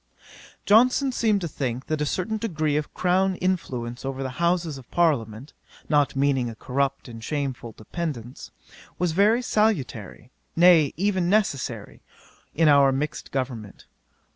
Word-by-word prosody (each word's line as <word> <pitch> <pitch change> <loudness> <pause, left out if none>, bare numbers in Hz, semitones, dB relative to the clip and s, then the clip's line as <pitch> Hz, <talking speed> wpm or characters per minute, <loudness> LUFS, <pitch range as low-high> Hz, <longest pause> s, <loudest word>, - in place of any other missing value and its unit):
'Johnson 255 +6 +4
seemed 220 -5 +1
to 170 - -2
think, 130 -4 -4
that 155 -1 -2
a 150 - 0
certain 220 +8 -2
degree 155 -9 -1
of 150 0 -2
crown 185 +1 +1
influence 125 -11 -3
over 135 0 -4
the 130 +2 -6
Houses 170 -4 0
of 125 - -16
Parliament, 135 -7 0 0.4
(not 145 -3 +2
meaning 135 -3 +1
a 115 - -8
corrupt 135 +4 -2
and 115 -2 -10
shameful 130 -4 -4
dependence,) 125 0 -6 0.5
was 180 -1 0
very 210 +8 +3
salutary, 135 - -1 0.2
nay, 165 -4 +6
even 190 -2 0
necessary, 140 - -1 0.5
in 160 0 +3
our 140 -2 +6
mixed 150 +3 -3
government. 120 -6 -5
150 Hz, 140 wpm, -24 LUFS, 130-180 Hz, 0.5 s, nay